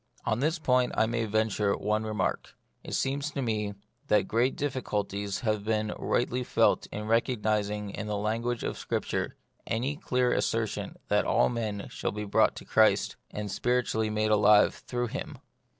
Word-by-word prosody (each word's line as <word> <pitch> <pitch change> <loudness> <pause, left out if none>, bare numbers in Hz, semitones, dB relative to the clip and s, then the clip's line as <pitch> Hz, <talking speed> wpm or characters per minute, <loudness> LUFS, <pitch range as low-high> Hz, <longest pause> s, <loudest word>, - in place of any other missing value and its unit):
On 110 - +1
this 155 +5 +1
point 125 -5 +2
I 110 - +4
may 115 0 -1
venture 110 -1 +1
one 105 +1 0
remark. 110 -1 -2 0.3
It - - -4
seems 140 +2 -1
to 140 - -4
me 105 -3 -1 0.3
that 105 - +3
great 120 +4 +1
difficulties 105 -7 -2
have 110 -4 0
been 110 0 0
rightly 125 +1 0
felt - - +2
in 105 +1 -6
recognising 105 -3 0
in 105 - -5
the 105 -1 -1
lan 110 +3 -1
guage 120 0 -2
of - - -3
Scripture - - -2 0.3
any 130 +6 -1
clear 125 -7 +1
assertion 110 -2 -1
that 105 0 +3
all 120 - +3
men 110 -4 -3
shall - - -2
be 105 0 -4
brought 100 - +3
to - - -9
Christ, - - +3
and 105 -1 -5
spirit 125 +2 +1
ually 110 -1 0
made 110 0 +1
alive 105 0 +6
through 120 -1 -3
Him. - - -5
110 Hz, 170 wpm, -29 LUFS, 105-120 Hz, 0.3 s, alive